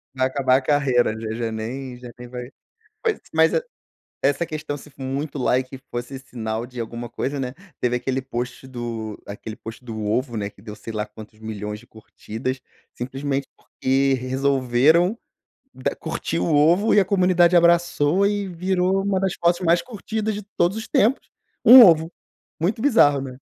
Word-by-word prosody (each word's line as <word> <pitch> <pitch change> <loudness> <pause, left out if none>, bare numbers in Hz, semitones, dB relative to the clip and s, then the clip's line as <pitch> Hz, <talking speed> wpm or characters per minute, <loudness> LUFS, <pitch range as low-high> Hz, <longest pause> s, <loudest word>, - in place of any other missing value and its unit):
Vai 130 0 +2
acabar 130 -1 +2
a - - -1
carreira, 130 -6 +2
já 110 -1 -4
já 115 0 -3
nem 125 +4 -5
já 125 -1 -10
nem 125 - -8
vai 125 0 -7 0.6
Mas 445 -2 +1
mas 160 0 +4
e - - +2 0.6
essa 145 +4 +1
questão, 155 -2 -5
se 145 +1 -12
for 135 -1 -16
muito 140 +2 -3
like 130 +1 0
fosse 120 +2 -5
sinal 115 -3 -4
de 125 0 -14
alguma 115 +1 -6
coisa, 135 +4 -3
né, 125 -1 -3 0.3
teve 125 0 +1
aquele 130 +2 -1
post 125 0 -5
do 115 -4 -5
aquele 105 +2 -7
post 115 +3 -10
do 110 -2 -5
ovo, 120 +3 -1
né, 100 -2 -2
que 100 - -21
deu 105 0 -9
sei 110 +2 -8
lá 105 -1 -2
quantos 110 0 -13
milhões 105 -1 -5
de 120 - -19
curtidas, 115 +3 -6 0.3
simplesmente 135 +2 -3
porque 135 +1 0
resolveram 135 - +2 0.6
da 130 - -3
curtir 85 - -3
o 90 - 0
ovo 170 +9 +4
e - - +6
a 195 - +3
comunidade 180 -2 +4
abraçou 170 0 +4
e 205 0 -1
virou 185 +2 0
uma 195 -1 +1
das 190 -2 0
fotos 170 +1 +2
mais 170 -1 +3
curtidas 220 -2 -3
de 210 - -5 0.2
todos 175 +4 +2
os 220 - -5
tempos, 235 +7 +2 0.3
um 255 +1 +11
ovo. 165 -4 +5 0.5
Muito 195 +7 0
bizarro, 145 - +4
né? 130 -1 -7
135 Hz, 175 wpm, -23 LUFS, 120-170 Hz, 0.6 s, um